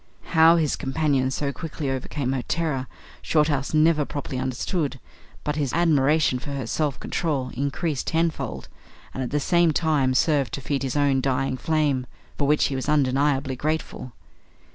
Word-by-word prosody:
How 165 Hz, 0 st, +6 dB
his 160 Hz, -4 st, +1 dB
companion 135 Hz, -2 st, 0 dB
so 140 Hz, +1 st, -2 dB
quickly 155 Hz, -3 st, -4 dB
overcame 135 Hz, 0 st, -3 dB
her 135 Hz, -1 st, -1 dB
terror, 150 Hz, -4 st, -2 dB, 0.3 s
Shorthouse 150 Hz, -3 st, +1 dB
never 155 Hz, 0 st, +4 dB
properly 140 Hz, -2 st, -5 dB
understood; 135 Hz, +3 st, -2 dB, 0.4 s
but 150 Hz, 0 st, -2 dB
his 140 Hz, -4 st, -1 dB
admiration 155 Hz, -4 st, +3 dB
for 140 Hz, +2 st, -6 dB
her 135 Hz, -4 st, -3 dB
self 145 Hz, +3 st, -1 dB
control 140 Hz, -6 st, -2 dB
increased 140 Hz, +2 st, -2 dB
tenfold, 165 Hz, 0 st, -1 dB, 0.5 s
and 130 Hz, -, -4 dB
at 125 Hz, -, -2 dB
the 150 Hz, -, 0 dB
same 170 Hz, +3 st, +3 dB
time 145 Hz, -5 st, +1 dB
served 140 Hz, -5 st, +2 dB
to -, -, -7 dB
feed 140 Hz, +1 st, -2 dB
his 135 Hz, +1 st, -2 dB
own 140 Hz, -2 st, +2 dB
dying 135 Hz, 0 st, 0 dB
flame 145 Hz, -3 st, 0 dB, 0.3 s
for 140 Hz, -, 0 dB
which 150 Hz, +1 st, +3 dB
he 135 Hz, -, -1 dB
was 130 Hz, +2 st, -3 dB
undeniably 140 Hz, -1 st, +1 dB
grateful. 150 Hz, -3 st, -3 dB
145 Hz, 160 wpm, -24 LUFS, 130-155 Hz, 0.5 s, How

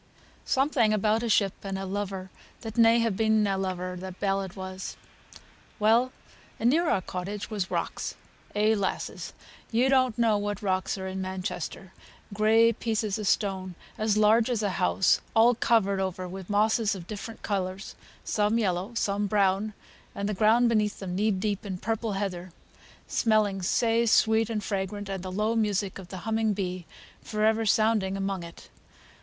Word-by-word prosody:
Something 260 Hz, -5 st, +2 dB
about 215 Hz, +2 st, +2 dB
a 235 Hz, -, -2 dB
ship 200 Hz, -3 st, +3 dB
and 195 Hz, -1 st, -3 dB
a 195 Hz, -, -4 dB
lover 190 Hz, -1 st, -4 dB, 0.3 s
that 225 Hz, -2 st, -6 dB
should 230 Hz, -, +6 dB
hae 230 Hz, 0 st, +4 dB
been 220 Hz, +1 st, +2 dB
na 200 Hz, -1 st, +1 dB
lover, 185 Hz, -1 st, -3 dB
the 185 Hz, +1 st, -7 dB
ballad 195 Hz, -1 st, -2 dB
was. 185 Hz, -1 st, -6 dB, 0.8 s
Well, 230 Hz, +4 st, +3 dB, 0.5 s
and 235 Hz, +2 st, +3 dB
near 330 Hz, +2 st, +2 dB
our 185 Hz, -, +1 dB
cottage 195 Hz, +5 st, -5 dB
were 215 Hz, -, -4 dB
rocks. -, -, -3 dB, 0.4 s
Eh, 215 Hz, +1 st, +3 dB
lasses! 200 Hz, -2 st, -3 dB, 0.4 s
ye 240 Hz, +3 st, +3 dB
don't 255 Hz, -4 st, +3 dB
know 225 Hz, -3 st, +3 dB
what 205 Hz, 0 st, -3 dB
rocks 185 Hz, 0 st, 0 dB
are 190 Hz, -, -5 dB
in 190 Hz, 0 st, -4 dB
Manchester! 185 Hz, 0 st, -5 dB, 0.4 s
Gray 225 Hz, +2 st, +4 dB
pieces 215 Hz, -2 st, -2 dB
o' -, -, -3 dB
stone 190 Hz, -3 st, 0 dB, 0.2 s
as 215 Hz, -1 st, +1 dB
large 220 Hz, +3 st, +4 dB
as 230 Hz, -3 st, 0 dB
a 200 Hz, -, +1 dB
house, 185 Hz, +1 st, +3 dB
all 230 Hz, +2 st, +6 dB
covered 215 Hz, -4 st, +2 dB
over 185 Hz, -1 st, -3 dB
wi' 190 Hz, +1 st, -7 dB
moss 215 Hz, +3 st, +3 dB
of 205 Hz, -6 st, -1 dB
different 215 Hz, +3 st, -8 dB
colours, 190 Hz, -1 st, -3 dB, 0.3 s
some 210 Hz, +1 st, +1 dB
yellow, 195 Hz, +1 st, -1 dB
some 205 Hz, -1 st, 0 dB
brown; 200 Hz, +1 st, +1 dB, 0.4 s
and 200 Hz, -, -2 dB
the 210 Hz, -, -1 dB
ground 220 Hz, +4 st, +4 dB
beneath 210 Hz, -3 st, +1 dB
them 180 Hz, -2 st, -5 dB
knee 210 Hz, +3 st, +2 dB
deep 200 Hz, +1 st, -1 dB
in 195 Hz, -3 st, -4 dB
purple 225 Hz, +2 st, -2 dB
heather, 185 Hz, -2 st, -4 dB, 0.5 s
smelling 215 Hz, -3 st, +1 dB
sae 230 Hz, +5 st, +2 dB
sweet 220 Hz, 0 st, +4 dB
and 215 Hz, -2 st, -2 dB
fragrant, 200 Hz, 0 st, -3 dB
and 195 Hz, -2 st, -3 dB
the 185 Hz, 0 st, -6 dB
low 215 Hz, +4 st, 0 dB
music 205 Hz, -3 st, 0 dB
of 185 Hz, -, -10 dB
the 185 Hz, +1 st, -8 dB
humming 225 Hz, -1 st, +1 dB
bee 185 Hz, -3 st, -4 dB, 0.3 s
for 215 Hz, 0 st, -1 dB
ever 220 Hz, 0 st, +2 dB
sounding 210 Hz, -2 st, +2 dB
among 195 Hz, -1 st, -2 dB
it. 170 Hz, 0 st, -12 dB
205 Hz, 170 wpm, -27 LUFS, 190-220 Hz, 0.8 s, should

